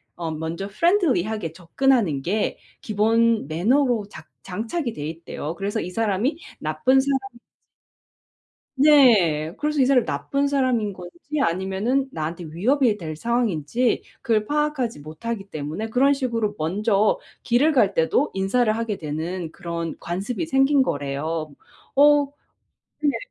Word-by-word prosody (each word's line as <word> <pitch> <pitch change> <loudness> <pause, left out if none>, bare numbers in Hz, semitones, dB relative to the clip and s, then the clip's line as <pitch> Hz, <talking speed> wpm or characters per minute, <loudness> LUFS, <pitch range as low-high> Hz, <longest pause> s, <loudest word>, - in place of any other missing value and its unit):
어 165 -2 -4
먼저 160 +4 -4
friendly 335 - +2
하게 210 -6 -4
접근하는 180 - +1
게 205 +9 -1 0.2
기본 225 -2 +2
매너로 225 - +2
작 - - -12
장착이 230 - -3
돼 150 0 -5
있대요. 165 -1 -6
그래서 200 +3 -2
이 175 - -5
사람이 225 - 0 0.2
나쁜 155 +13 +2
사람인지 265 -2 -2 1.4
네. 220 - +5
그래서 300 0 -1
이 - - +5
사람이 255 -3 +3
나쁜 275 - -1
사람인 255 -7 +1
건지 180 - -11 0.3
아니면은 195 +8 0
나한테 165 0 -4
위협이 215 - +1
될 160 -5 -6
상황인지 230 - 0 0.2
그걸 220 -4 +1
파악하지 295 - -1
못하기 195 +7 -6
때문에 155 +9 -4
그런 270 +5 +4
식으로 230 -6 -1
먼저 200 +6 +1 0.2
길을 255 +6 +3
갈 220 -9 +3
때도 180 - +1
인사를 215 +4 +1
하게 225 -3 -2
되는 160 +2 -4
그런 170 -2 -5
관습이 200 - -3
생긴 270 0 +4
거래요. 150 - -2 0.4
어. 290 +1 +6 0.8
근데 290 -2 +1
215 Hz, 305 characters per minute, -23 LUFS, 170-260 Hz, 1.4 s, 어